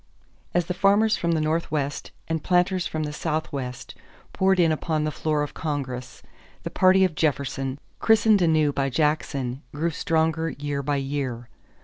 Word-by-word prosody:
As 175 Hz, -1 st, +2 dB
the 180 Hz, -, -2 dB
farmers 200 Hz, +4 st, +3 dB
from 170 Hz, -1 st, 0 dB
the 160 Hz, -, +1 dB
Northwest 155 Hz, -2 st, -1 dB, 0.2 s
and 160 Hz, -2 st, -2 dB
planters 180 Hz, 0 st, +2 dB
from 155 Hz, 0 st, -3 dB
the 150 Hz, 0 st, -4 dB
Southwest 145 Hz, -6 st, -4 dB, 0.4 s
poured 190 Hz, 0 st, +2 dB
in 165 Hz, -2 st, +4 dB
upon 155 Hz, 0 st, -1 dB
the 155 Hz, -, -1 dB
floor 150 Hz, 0 st, -1 dB
of 145 Hz, -, -5 dB
Congress, 135 Hz, -5 st, -4 dB, 0.4 s
the -, -, -4 dB
party 190 Hz, +1 st, +5 dB
of 180 Hz, -, -1 dB
Jefferson, 135 Hz, -3 st, -1 dB, 0.2 s
christened 220 Hz, -2 st, +4 dB
anew 155 Hz, -4 st, +3 dB
by 135 Hz, 0 st, 0 dB
Jackson, 140 Hz, -3 st, -1 dB
grew 165 Hz, +4 st, -1 dB
stronger 160 Hz, +1 st, 0 dB
year 145 Hz, 0 st, -3 dB
by 145 Hz, +1 st, -1 dB
year. 135 Hz, -4 st, -3 dB
155 Hz, 155 wpm, -25 LUFS, 140-170 Hz, 0.4 s, party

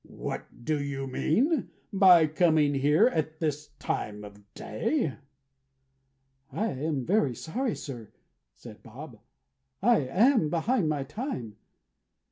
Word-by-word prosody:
"What 120 Hz, -, -7 dB
do 155 Hz, -2 st, 0 dB
you 135 Hz, -1 st, -4 dB
mean 240 Hz, -, 0 dB, 0.2 s
by 185 Hz, -4 st, +7 dB
coming 155 Hz, -2 st, +2 dB
here 145 Hz, +8 st, +3 dB
at 160 Hz, -9 st, -1 dB
this 150 Hz, -2 st, -2 dB
time 105 Hz, -5 st, -4 dB
of 100 Hz, 0 st, -14 dB
day?" 145 Hz, -, -2 dB, 1.4 s
"I 215 Hz, -, -2 dB
am 140 Hz, -1 st, -3 dB
very 175 Hz, -, +1 dB
sorry, 235 Hz, -, -3 dB
sir," 120 Hz, -7 st, -8 dB, 0.4 s
said -, -, -13 dB
Bob. -, -, -11 dB, 0.6 s
"I 235 Hz, +3 st, +4 dB
am 185 Hz, -, +3 dB
behind 175 Hz, +3 st, 0 dB
my 145 Hz, -3 st, -1 dB
time." 135 Hz, -, -6 dB
155 Hz, 115 wpm, -28 LUFS, 135-200 Hz, 1.4 s, by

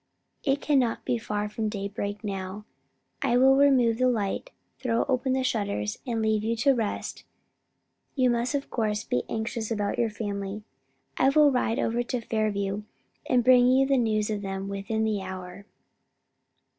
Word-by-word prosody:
It 275 Hz, 0 st, +1 dB
can 290 Hz, -2 st, +3 dB
not 240 Hz, -3 st, -1 dB
be 240 Hz, -, 0 dB
far 210 Hz, -1 st, -2 dB
from 215 Hz, +1 st, -3 dB
daybreak 205 Hz, 0 st, -4 dB
now: 195 Hz, 0 st, -5 dB, 0.6 s
I 245 Hz, -3 st, +2 dB
will 265 Hz, +1 st, +6 dB
remove 255 Hz, -5 st, +4 dB
the 255 Hz, -, +4 dB
light, 220 Hz, -, -2 dB, 0.3 s
throw 235 Hz, -3 st, +1 dB
open 260 Hz, -1 st, 0 dB
the 260 Hz, 0 st, +1 dB
shutters 200 Hz, -, -1 dB
and 230 Hz, -2 st, -1 dB
leave 215 Hz, -1 st, +1 dB
you 230 Hz, +1 st, 0 dB
to 255 Hz, +5 st, +3 dB
rest. 225 Hz, -5 st, -3 dB, 0.9 s
You 255 Hz, -3 st, +3 dB
must 240 Hz, +4 st, 0 dB
of 280 Hz, -, -3 dB
course 215 Hz, -2 st, -1 dB
be 125 Hz, -, 0 dB
anxious 220 Hz, 0 st, -3 dB
about 210 Hz, -3 st, -1 dB
your 235 Hz, -1 st, +2 dB
family. 205 Hz, -1 st, -4 dB, 0.5 s
I 265 Hz, -, +4 dB
will 295 Hz, 0 st, +5 dB
ride 245 Hz, -3 st, 0 dB
over 235 Hz, +1 st, 0 dB
to 240 Hz, +1 st, -2 dB
Fairview 210 Hz, -3 st, -1 dB, 0.5 s
and 245 Hz, -1 st, +3 dB
bring 250 Hz, 0 st, +6 dB
you 260 Hz, +1 st, +4 dB
news 220 Hz, -3 st, +1 dB
of 210 Hz, -1 st, -2 dB
them 195 Hz, 0 st, -4 dB
within 200 Hz, +3 st, -2 dB
the 215 Hz, -2 st, 0 dB
hour." 185 Hz, +1 st, -8 dB
220 Hz, 165 wpm, -27 LUFS, 205-250 Hz, 0.9 s, will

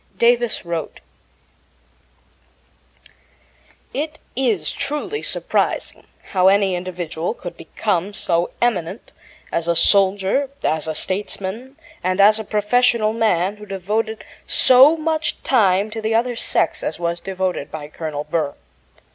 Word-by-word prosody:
Davis 240 Hz, -3 st, +2 dB
wrote: 170 Hz, -1 st, -4 dB, 2.9 s
It 305 Hz, +2 st, -3 dB, 0.2 s
is 225 Hz, -12 st, 0 dB
truly 300 Hz, +10 st, -3 dB
surprising -, -, -1 dB, 0.2 s
how 185 Hz, -1 st, +4 dB
any 195 Hz, -1 st, +4 dB
individual 175 Hz, +1 st, -3 dB
could 175 Hz, -, -8 dB
become 195 Hz, -2 st, -2 dB
so 170 Hz, -3 st, 0 dB
eminent 190 Hz, -5 st, -1 dB, 0.4 s
as 170 Hz, 0 st, -1 dB
a 170 Hz, -, +2 dB
soldier, 195 Hz, +8 st, +3 dB
as 160 Hz, 0 st, 0 dB
a 160 Hz, -, -2 dB
statesman, 205 Hz, -, -4 dB, 0.3 s
and 185 Hz, +1 st, 0 dB
as 210 Hz, +2 st, +6 dB
a -, -, -3 dB
professional 215 Hz, +1 st, +2 dB
man 205 Hz, -3 st, +1 dB
who 210 Hz, -, -10 dB
devoted 215 Hz, +4 st, -2 dB, 0.2 s
so 265 Hz, +5 st, +6 dB
much 315 Hz, 0 st, -1 dB
time 205 Hz, -4 st, +3 dB
to 225 Hz, 0 st, -5 dB
the 220 Hz, +1 st, 0 dB
other 240 Hz, +1 st, +1 dB
sex -, -, 0 dB
as -, -, -3 dB
was 170 Hz, 0 st, -1 dB
devoted 185 Hz, -5 st, -3 dB
by 150 Hz, -2 st, -7 dB
Colonel 150 Hz, -1 st, -5 dB
Burr. 150 Hz, -3 st, -2 dB
200 Hz, 120 wpm, -20 LUFS, 175-235 Hz, 2.9 s, as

